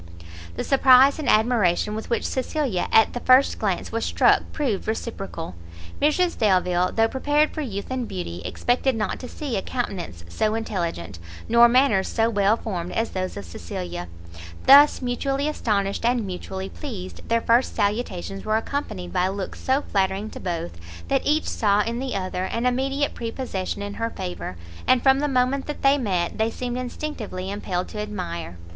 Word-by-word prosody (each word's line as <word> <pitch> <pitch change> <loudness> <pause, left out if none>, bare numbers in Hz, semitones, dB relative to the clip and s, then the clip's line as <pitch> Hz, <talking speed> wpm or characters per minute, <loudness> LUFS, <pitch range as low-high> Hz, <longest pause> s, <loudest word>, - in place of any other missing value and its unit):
The - - -3
surprise 270 +1 +6
and 305 - -1
admiration 215 -3 +3
with 220 +1 -5
which 235 - 0
Cecilia 260 -6 -1
at 220 - +5
the 245 - -3
first 255 +3 +4
glance 195 -4 -1
was 230 0 -2
struck - - +4
proved 255 -10 -2
reciprocal: 195 - -4 0.5
Mrs 340 +4 +2
Delvile, 180 -3 +2
though 225 0 +3
prepared 290 +5 +1
for 310 - -3
youth 205 -5 -5
and 255 -2 -2
beauty, 85 -1 -5
expected 250 +1 0
not 215 -3 -2
to 250 - -7
see 280 -6 -4
a - - -1
countenance 190 - -4
so 215 - 0
intelligent, 170 - -3 0.3
nor 235 +1 +6
manners 240 -6 +3
so 225 0 +1
well 205 +1 +3
formed 180 -6 -4
as 225 +1 -1
those 185 -1 -3
of 100 - -6
Cecilia: 85 +1 -6 0.6
thus 285 0 +7
mutually 270 +3 -1
astonished 205 -10 -1
and 240 -1 +1
mutually 190 0 -5
pleased, 200 -11 -8
their 230 0 +3
first 235 +3 +2
salutations 200 -3 -2
were 215 0 +1
accompanied 215 -7 -4
by 180 0 +2
looks 195 0 -5
so 265 +2 +1
flattering 195 +2 -1
to - - -8
both, 165 - -4 0.3
that 270 - +2
each 305 +2 +2
saw 210 -2 +2
in 235 +2 -3
the 265 -3 -3
other, 185 -1 -2
an 230 +5 -2
immediate 270 +3 0
prepossession 225 -5 -4
in 205 0 -5
her 230 +2 -2
favour, 180 - -6 0.3
and 255 -1 +4
from 270 0 +5
the 295 - +1
moment 265 0 +1
that 295 - -6
they 275 +1 +5
met, 185 -5 -1
they 220 +1 +2
seemed 245 +1 -4
instinctively 240 -8 -5
impelled 185 -3 -3
to 210 - -7
admire. 175 - -5
220 Hz, 170 wpm, -24 LUFS, 185-255 Hz, 0.6 s, thus